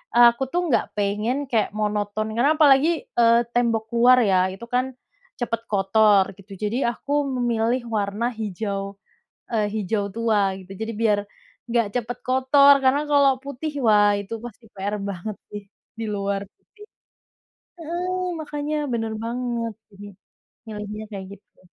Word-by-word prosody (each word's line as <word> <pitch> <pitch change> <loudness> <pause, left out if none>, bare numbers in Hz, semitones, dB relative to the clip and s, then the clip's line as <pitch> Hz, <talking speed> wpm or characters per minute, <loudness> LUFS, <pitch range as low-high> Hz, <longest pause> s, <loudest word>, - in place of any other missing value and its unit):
aku 240 +2 +6
tuh 355 - +1
nggak 230 - +2
pengen 210 +5 0
kayak 225 -2 +2
monoton 210 0 -1
karena 275 +6 +3
apalagi, 285 +1 +6 0.3
eee, 230 0 +6
tembok 230 -2 +1
luar 250 +2 +6
ya 185 - +4 0.2
itu 195 - -11
kan 250 +1 +2 0.5
cepet 230 -1 -2
kotor 200 0 +4
gitu, 195 +1 -17
jadi 215 +4 -1
aku 280 - -9 0.3
memilih 240 +1 +1
warna 205 +2 -1
hijau, 200 -1 -4 0.6
eee, 215 -2 +1
hijau 205 0 -1
tua 225 -2 +1 0.2
gitu. 185 +1 -12
Jadi 225 +1 -3
biar 210 -3 +3 0.5
nggak 230 -2 +2
cepet 245 0 -3
kotor 270 +2 +6
karena 260 +2 +4
kalau 275 -2 +4
putih 280 +2 -5
wah 205 -1 +5
itu 200 +3 -6
pasti 235 -1 -10
PR 200 +2 -3
banget 200 +3 -6 0.2
sih 205 -1 -6 0.4
di 225 - -2
luar 200 0 -2
putih. 420 - -19 1.0
Heeh, 360 +3 -3 0.2
makanya 295 0 -4 0.2
bener 225 -1 -2
banget, 235 -1 -3 0.2
jadi 205 +1 -11 0.6
milihnya 210 0 -6
kayak 190 -1 -6
gitu. - - -36
225 Hz, 140 wpm, -23 LUFS, 205-250 Hz, 1.0 s, aku